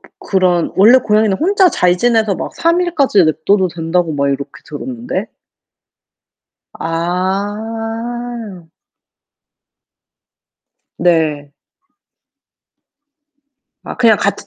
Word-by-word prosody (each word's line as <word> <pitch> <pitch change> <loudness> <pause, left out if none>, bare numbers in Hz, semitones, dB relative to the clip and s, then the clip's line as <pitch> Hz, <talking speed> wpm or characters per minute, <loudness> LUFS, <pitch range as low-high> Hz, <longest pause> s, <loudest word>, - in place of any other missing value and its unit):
그 - - -20
그런 180 -3 0
원래 225 +7 +7
고양이는 215 -4 +1
혼자 380 +2 +3
잘 180 - +1
지내서 225 -3 +2
막 - - -6
3 340 +1 +1
일까지 285 - +2
냅둬도 185 +5 +1
된다고 165 0 -1
막 140 0 0
이렇게 140 +1 -3
들었는데. 245 - -5 1.5
아. 210 +3 -4 2.2
네. 155 -4 0 2.3
아 - - -7
그냥 230 -4 +4
같이 200 - -2
200 Hz, 165 characters per minute, -15 LUFS, 170-235 Hz, 2.3 s, 원래